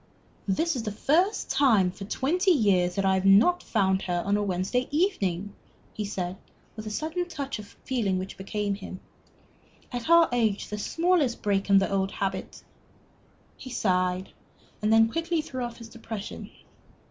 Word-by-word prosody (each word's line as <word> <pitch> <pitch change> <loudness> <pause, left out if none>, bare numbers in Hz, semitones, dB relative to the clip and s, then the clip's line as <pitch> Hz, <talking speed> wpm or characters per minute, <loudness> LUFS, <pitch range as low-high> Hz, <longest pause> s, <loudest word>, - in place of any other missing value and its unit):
"This 320 - +1
is 250 - -2
the 215 -2 -3
first 340 - +1
time 215 -10 +4
for 195 +2 -9
twenty 340 - 0
years 195 - +3
that 195 - 0
I 190 - +4
have 190 0 +1
not 210 - +5
found 190 -3 +1
her 175 -1 -1
on 200 +1 +2
a 210 - +1
Wednesday 200 +6 -1
evening," 205 - 0 0.4
he 215 - -3
said, 185 -2 -4 0.4
with 215 0 -7
a - - -2
sudden 320 +10 -2
touch 280 -8 -5
of 205 -1 -12
feeling 220 -8 0
which 185 +1 -5
became 205 +1 -2
him. 195 -2 -8 0.9
"At 245 +4 -4
our 335 0 +7
age, 225 -4 0
the 210 - -4
smallest 325 - +1
break 200 -1 0
in 200 - +7
the 195 0 +2
old 195 0 0
habit 190 -1 -4 0.5
" - - -34
He 260 - -8
sighed, 185 -5 0 0.5
and 210 +1 +1
then 225 0 +6
quickly 330 +6 -1
threw 260 -5 -4
off 240 -1 -5
his 230 -1 -11
depression. 225 -3 -7
210 Hz, 170 wpm, -27 LUFS, 195-265 Hz, 0.9 s, our